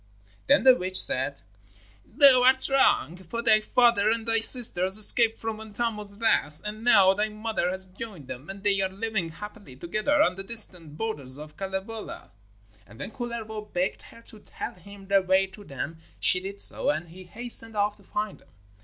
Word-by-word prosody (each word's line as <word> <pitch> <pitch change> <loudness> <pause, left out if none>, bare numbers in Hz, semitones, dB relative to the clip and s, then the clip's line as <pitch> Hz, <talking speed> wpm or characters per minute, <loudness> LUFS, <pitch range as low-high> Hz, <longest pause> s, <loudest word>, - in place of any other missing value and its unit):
Then 285 - +3
the 260 -1 +7
witch 185 -3 -2
said: 135 +2 0 0.6
'Thou 265 0 +6
art 260 +1 +6
wrong, 265 - +2
for 190 +6 -7
thy 215 -2 +4
father 230 -2 +2
and 225 0 -2
thy 230 0 +2
sisters 205 -5 +2
escaped 225 +1 +6
from 225 -1 -6
Untamo's 210 -2 -6
wrath, 155 -9 0
and 215 +1 -7
now 195 -5 +5
thy 210 +2 -1
mother 215 -4 -3
has 190 +1 -4
joined 185 - -10
them 130 +6 -9
and 195 0 -9
they 200 -1 +2
are 190 - 0
living 200 -2 -4
happily 205 - -11
together 215 - -1
on 180 - -1
the 195 - -5
distant 180 -8 -1
borders 140 -12 -6
of 150 0 -12
Kalevala.' 195 +4 -7 0.6
And 105 +2 -16
when - - -7
Kullervo 230 -3 -6
begged 180 +2 -2
her 230 - -17
to 220 - -15
tell - - -8
him 195 +2 -15
the 195 0 +3
way 190 +1 +2
to 195 +2 -14
them 160 +1 -7 0.2
she 185 - +2
did 195 +2 -3
so, - - +4
and 160 +3 -3
he 185 +2 -13
hastened 225 +2 0
off 205 0 -1
to 200 - -22
find 210 +1 -5
them. - - -26
205 Hz, 185 wpm, -25 LUFS, 185-225 Hz, 0.6 s, the